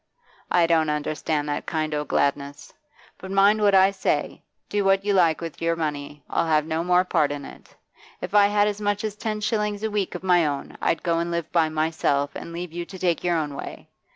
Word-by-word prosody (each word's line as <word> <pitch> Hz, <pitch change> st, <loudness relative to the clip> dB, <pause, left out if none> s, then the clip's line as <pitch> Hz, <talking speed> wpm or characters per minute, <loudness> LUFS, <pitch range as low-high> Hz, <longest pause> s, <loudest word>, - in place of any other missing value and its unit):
I 175 Hz, -1 st, +4 dB
don't 160 Hz, -2 st, +2 dB
understand 150 Hz, 0 st, -2 dB
that 145 Hz, -, -3 dB
kind 155 Hz, -2 st, -2 dB
o' 150 Hz, 0 st, -1 dB
gladness. 140 Hz, 0 st, -2 dB, 0.5 s
But 190 Hz, -, -9 dB
mind 200 Hz, +2 st, +4 dB
what 200 Hz, -1 st, +4 dB
I 190 Hz, +1 st, +6 dB
say; 195 Hz, -, -2 dB, 0.3 s
do 205 Hz, -1 st, -1 dB
what 195 Hz, 0 st, +2 dB
you 205 Hz, -, +2 dB
like 170 Hz, -4 st, +3 dB
with 165 Hz, -2 st, -7 dB
your 165 Hz, 0 st, +1 dB
money, 145 Hz, -3 st, -4 dB
I'll -, -, 0 dB
have 155 Hz, -1 st, +2 dB
no 160 Hz, +1 st, -2 dB
more 180 Hz, +1 st, +3 dB
part 150 Hz, -5 st, +1 dB
in 145 Hz, -1 st, -5 dB
it. -, -, -14 dB, 0.4 s
If -, -, -6 dB
I 205 Hz, -1 st, +6 dB
had 205 Hz, 0 st, +2 dB
as 210 Hz, 0 st, -3 dB
much 205 Hz, +1 st, -1 dB
as 215 Hz, -2 st, -3 dB
ten 215 Hz, 0 st, -4 dB
shillings 210 Hz, -1 st, -1 dB
a 220 Hz, -, -1 dB
week 200 Hz, -3 st, -2 dB
of 180 Hz, -, -6 dB
my 175 Hz, -4 st, +3 dB
own, 140 Hz, -1 st, -4 dB
I'd -, -, 0 dB
go 170 Hz, -2 st, +1 dB
and 170 Hz, 0 st, -2 dB
live 170 Hz, -1 st, -3 dB
by 165 Hz, -2 st, +2 dB
myself, 155 Hz, -3 st, 0 dB
and -, -, -8 dB
leave 170 Hz, 0 st, -6 dB
you 175 Hz, 0 st, -4 dB
to 190 Hz, +2 st, -10 dB
take 175 Hz, -3 st, 0 dB
your 175 Hz, -1 st, +1 dB
own 150 Hz, -3 st, -2 dB
way. -, -, -8 dB
170 Hz, 225 wpm, -24 LUFS, 155-195 Hz, 0.5 s, I